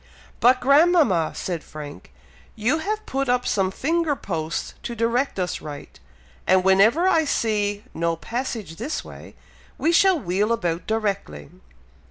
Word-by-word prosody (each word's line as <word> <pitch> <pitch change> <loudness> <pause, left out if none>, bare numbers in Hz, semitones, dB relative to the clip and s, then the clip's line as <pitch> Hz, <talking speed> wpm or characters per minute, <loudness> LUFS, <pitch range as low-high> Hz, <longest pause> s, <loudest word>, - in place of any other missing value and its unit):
"But 255 +1 +4
grandmama!" 280 - +4
said 175 -4 -4
Frank, 150 -1 -10 0.4
"you 240 +9 +1
have 430 +5 -3
put 270 0 -2
up 250 0 +1
some 190 -2 +1
finger 315 - 0
posts 165 -8 -4
to 235 - -5
direct 235 +3 0
us 180 -1 -2
right; 145 - -9 0.5
and 185 0 +4
whenever 215 - +4
I 325 -4 +4
see 210 -7 -1
'no 170 0 0
passage 230 - -5
this 265 +8 -4
way,' - - -12 0.4
we 325 - +1
shall 370 0 +4
wheel 200 +1 0
about 175 -7 -1
directly." 200 - -3
220 Hz, 140 wpm, -23 LUFS, 180-280 Hz, 0.5 s, But